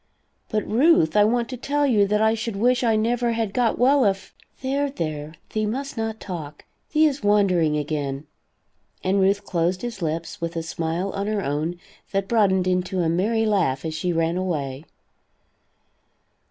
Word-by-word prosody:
"But, 215 -1 -1
Ruth, 230 - +4
I 210 - +6
want 235 +1 +1
to 255 - -5
tell 290 +4 0
you 210 -7 +3
that 210 +2 +2
I 220 0 +4
should 225 -1 -3
wish 245 +5 +2
I 225 -2 +3
never 235 +2 +1
had 225 -3 -2
got 240 -3 +1
well 270 +2 +4
if 195 -1 -1
" - - -36
"There, 280 +2 0
there, 155 - -5 0.2
thee 215 -1 0
must 275 +6 -4
not 225 -1 -3
talk. 155 -6 -7 0.3
Thee 310 +1 +4
is 290 -2 0
wandering 185 -7 +3
again," 145 -1 -3 0.8
and 195 +1 +2
Ruth 200 +1 +2
closed 175 +2 -1
his 235 -5 -5
lips, 165 +1 -3
with 170 0 -3
a 165 - -2
smile 165 +4 -2
on 200 +1 -3
her 210 -2 -1
own 155 +5 -2 0.3
that 195 0 0
broadened 195 -5 +3
into 180 0 0
a 165 - +1
merry 220 +7 +1
laugh 180 -11 +1
as 160 - -3
she 165 +3 -1
ran 165 +1 0
away. 150 -6 -3
195 Hz, 180 wpm, -23 LUFS, 165-225 Hz, 0.8 s, I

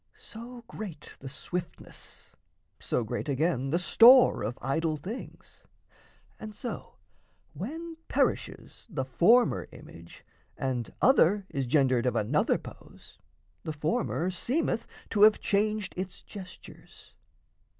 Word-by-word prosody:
So 235 +2 -10
great 180 -9 -8
the 135 - -8
swiftness, 175 +5 -7 0.5
So 120 - -1
great, 120 +6 -4
again, 140 -1 0
the 165 - +1
store 240 +8 +7
of 110 +4 -3
idol 155 +4 -1
things, 195 - -9 0.8
And 215 -1 -8
so, 245 - -7 0.6
when 325 - -6
perishes - - -2
the 150 -9 -3
former 220 - +3
image, 85 +1 -14 0.3
And 125 -3 -3
other 205 - +4
is 135 -2 -2
gendered 130 -2 +2
of 125 - 0
another 105 - +1
pose, - - -14 0.4
The 155 - -4
former 165 +3 -1
seemeth 250 - -1 0.2
to 205 - 0
have 215 0 +7
changed 210 0 0
its 185 0 -6
gestures. 190 -3 -13
175 Hz, 115 wpm, -28 LUFS, 135-220 Hz, 0.8 s, store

